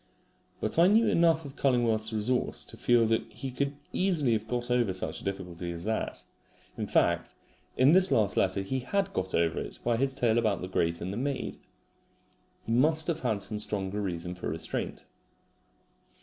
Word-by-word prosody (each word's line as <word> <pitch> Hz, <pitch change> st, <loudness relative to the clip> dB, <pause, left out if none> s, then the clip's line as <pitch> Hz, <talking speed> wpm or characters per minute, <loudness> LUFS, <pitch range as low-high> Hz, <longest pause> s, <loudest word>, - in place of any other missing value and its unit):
But -, -, -1 dB
I 170 Hz, -, +7 dB
knew 220 Hz, +4 st, +5 dB
enough 165 Hz, -4 st, +3 dB
of 140 Hz, 0 st, -9 dB
Cullingworth's 120 Hz, -5 st, +1 dB
resource 110 Hz, +3 st, 0 dB
to -, -, -8 dB
feel 120 Hz, -1 st, +3 dB
that 115 Hz, 0 st, +2 dB
he 135 Hz, -2 st, -6 dB
could 140 Hz, +3 st, -2 dB, 0.2 s
easily 165 Hz, -10 st, +2 dB
have 110 Hz, 0 st, -2 dB
got 120 Hz, +1 st, -2 dB
over 120 Hz, -6 st, +2 dB
such 95 Hz, -, -3 dB
a -, -, -13 dB
difficulty 90 Hz, -3 st, -4 dB
as 85 Hz, 0 st, -6 dB
that. 110 Hz, +2 st, -2 dB, 0.5 s
In -, -, -4 dB
fact, -, -, +1 dB, 0.4 s
in 130 Hz, +3 st, +6 dB
this 185 Hz, +2 st, +6 dB
last 105 Hz, -3 st, +2 dB
letter 95 Hz, +1 st, +1 dB
he 130 Hz, +7 st, -2 dB
HAD 195 Hz, +10 st, -1 dB
got 95 Hz, 0 st, -2 dB
over 85 Hz, -1 st, +1 dB
it -, -, -6 dB
by 120 Hz, -1 st, +1 dB
his 135 Hz, +1 st, 0 dB
tale 120 Hz, -3 st, +2 dB
about 110 Hz, -4 st, 0 dB
the 90 Hz, -, -4 dB
grate 85 Hz, -2 st, 0 dB
and 95 Hz, +3 st, -3 dB
the -, -, -4 dB
maid. 135 Hz, +2 st, -3 dB, 1.1 s
He -, -, -3 dB
must 155 Hz, +6 st, +3 dB
have 165 Hz, -1 st, -1 dB
had 110 Hz, -7 st, -1 dB
some 105 Hz, +2 st, -4 dB
stronger 100 Hz, -1 st, -2 dB
reason 90 Hz, -2 st, -3 dB
for 90 Hz, -4 st, -5 dB
restraint. 80 Hz, +2 st, -4 dB
115 Hz, 185 wpm, -29 LUFS, 95-135 Hz, 1.1 s, I